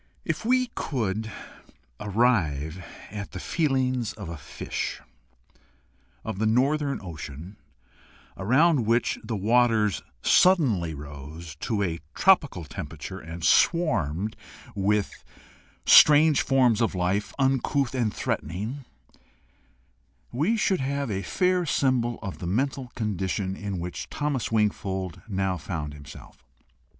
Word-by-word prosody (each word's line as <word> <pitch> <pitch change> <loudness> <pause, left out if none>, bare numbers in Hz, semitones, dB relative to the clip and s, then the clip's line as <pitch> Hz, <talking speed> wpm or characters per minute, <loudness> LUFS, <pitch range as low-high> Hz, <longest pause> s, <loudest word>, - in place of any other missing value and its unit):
If - - -2
we 250 +1 +2
could 110 -4 -2 0.7
arrive 95 - +1 0.3
at 100 -1 -7
the 95 - -5
feelings 130 - 0
of 100 -5 -8
a 85 - -5
fish 70 - -5 1.3
of 95 - -4
the 110 - +2
northern 140 +5 +1
ocean 80 +2 -8 0.8
around 130 - +3
which 115 +1 +1
the 115 - -3
waters 110 -1 +2 0.2
suddenly 115 - +4
rose 75 +3 -9
to 95 -3 -1 0.2
tropical 145 - +3
temperature, 75 +6 -7
and 80 0 -8
swarmed 105 - +2 0.4
with 100 +1 0 0.6
strange 150 0 +7
forms 125 -4 +3
of 110 -4 +1
life, 95 +3 0
uncouth 135 0 +1
and 120 -5 0
threatening, 105 - -3 1.5
we 160 - +1
should 190 -4 +1
have 140 -2 -2
a 95 -1 -2
fair 180 - +1
symbol 130 -6 +1
of 95 -7 -6
the 85 - -4
mental 130 +6 -1
condition 95 -2 -2
in 100 -2 -4
which 90 +1 -5
Thomas 145 -6 -2
Wingfold 95 -4 -1
now 95 -3 -1
found 75 -1 -5
himself. 70 -1 -13
105 Hz, 110 wpm, -26 LUFS, 90-135 Hz, 1.5 s, strange